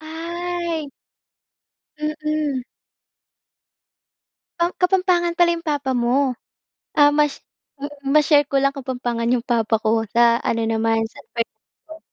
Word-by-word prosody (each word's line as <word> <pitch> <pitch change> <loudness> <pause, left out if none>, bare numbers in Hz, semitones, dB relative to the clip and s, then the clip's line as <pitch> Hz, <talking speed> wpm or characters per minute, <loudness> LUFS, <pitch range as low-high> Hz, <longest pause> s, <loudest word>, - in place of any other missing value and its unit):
Ay. 335 -1 -4 1.1
Mm. 305 -3 -2 2.0
Um, 345 +1 +1
Kapampangan 360 -2 +2
pala 345 -1 +5
'yong 335 - -9
papa 285 -4 -1
mo. 250 +1 +1 0.6
Ah, 290 -1 +5
mash 295 -2 +1 0.4
mm. 290 0 -8
Ma-share 295 -1 +5
ko 275 -1 0
lang 275 +1 +1
Kapampangan 245 -3 -2
'yong 240 -2 0
papa 225 -2 +1
ko. 225 0 +1
Sa 235 0 +4
ano 230 0 0
naman, 225 0 +1
sa - - -15
San 235 - -7
Fernando 315 +8 -7
285 Hz, 120 wpm, -21 LUFS, 235-315 Hz, 2.0 s, pala